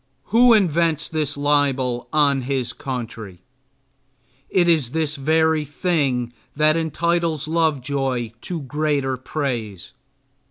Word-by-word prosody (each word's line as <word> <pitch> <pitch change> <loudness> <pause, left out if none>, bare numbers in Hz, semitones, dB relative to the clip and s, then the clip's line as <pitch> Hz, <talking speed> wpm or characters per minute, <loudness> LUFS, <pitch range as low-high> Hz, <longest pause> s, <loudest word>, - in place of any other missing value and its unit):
Who 240 +1 +7
invents 165 -5 +1
this 150 -3 -2
libel 140 -4 0
on 140 -3 +2
his 130 -2 -2
country? 115 -8 -7 1.1
It 175 -2 +2
is 155 -8 +2
this 160 -1 0
very 160 +2 +2
thing 140 -6 -1 0.2
that 155 +1 +4
entitles 165 -1 -1
Lovejoy 135 -6 -1
to 170 -3 -5
greater 140 -1 -1
praise. 120 - -4
145 Hz, 105 wpm, -21 LUFS, 130-160 Hz, 1.1 s, Who